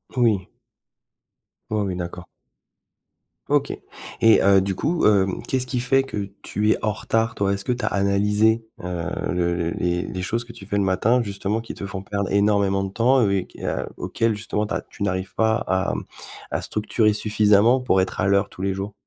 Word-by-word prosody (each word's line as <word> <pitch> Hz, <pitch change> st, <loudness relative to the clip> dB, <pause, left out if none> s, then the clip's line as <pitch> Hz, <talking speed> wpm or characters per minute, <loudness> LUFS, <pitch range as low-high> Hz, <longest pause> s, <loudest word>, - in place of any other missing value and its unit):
Oui. 110 Hz, -7 st, +2 dB, 1.2 s
Oui, 110 Hz, -, 0 dB
oui, 95 Hz, -2 st, -2 dB
d'accord. 90 Hz, 0 st, -6 dB, 1.2 s
OK -, -, +2 dB, 0.5 s
et 115 Hz, -1 st, +6 dB
heu, 100 Hz, 0 st, +6 dB
du 95 Hz, 0 st, -1 dB
coup, 165 Hz, -, 0 dB
hem, 95 Hz, -3 st, +3 dB
qu'est-ce 130 Hz, -1 st, -1 dB
qui 125 Hz, 0 st, -2 dB
fait 135 Hz, +2 st, +2 dB
que 105 Hz, -7 st, -5 dB
tu 105 Hz, +1 st, 0 dB
es -, -, +2 dB
en 110 Hz, -, +2 dB
retard, 115 Hz, +2 st, -1 dB
toi? 100 Hz, -2 st, 0 dB
Est-ce 100 Hz, 0 st, -3 dB
que -, -, -1 dB
tu 120 Hz, -2 st, -2 dB
as -, -, 0 dB
analysé, 105 Hz, +3 st, +2 dB, 0.2 s
heu, 90 Hz, -2 st, -3 dB, 0.2 s
le 85 Hz, -1 st, 0 dB
le 85 Hz, -1 st, -1 dB
les 90 Hz, 0 st, -1 dB
les 95 Hz, +1 st, -5 dB
choses 115 Hz, +6 st, -2 dB
que 120 Hz, -, -12 dB
tu 115 Hz, -4 st, -12 dB
fais 100 Hz, +1 st, -3 dB
le 100 Hz, -, +2 dB
matin 105 Hz, +6 st, +2 dB
justement, 100 Hz, +1 st, -2 dB
qui 115 Hz, -, -8 dB
te -, -, -7 dB
font 95 Hz, 0 st, -5 dB
perdre 100 Hz, 0 st, -3 dB
énormément 100 Hz, -1 st, +2 dB
de 95 Hz, -, -4 dB
temps 125 Hz, +5 st, +3 dB
et -, -, +4 dB
au -, -, +1 dB
et 95 Hz, -2 st, 0 dB
qu -, -, -13 dB
a -, -, -2 dB
auquel 115 Hz, -1 st, -1 dB
justement 105 Hz, 0 st, -2 dB
tu -, -, -4 dB
as -, -, -1 dB
tu 100 Hz, -, -6 dB
n'arrives 95 Hz, -1 st, -2 dB
pas 110 Hz, +1 st, +2 dB
à, 95 Hz, +1 st, 0 dB
mmh, -, -, -4 dB, 0.5 s
à -, -, -1 dB
structurer 105 Hz, 0 st, +1 dB
suffisamment 105 Hz, +3 st, +3 dB
pour 110 Hz, -7 st, +2 dB
être 95 Hz, -, -3 dB
à 95 Hz, -, +2 dB
l'heure 100 Hz, 0 st, +2 dB
tous -, -, -11 dB
les 95 Hz, 0 st, 0 dB
jours? 100 Hz, +2 st, -5 dB
100 Hz, 210 wpm, -23 LUFS, 95-110 Hz, 1.2 s, et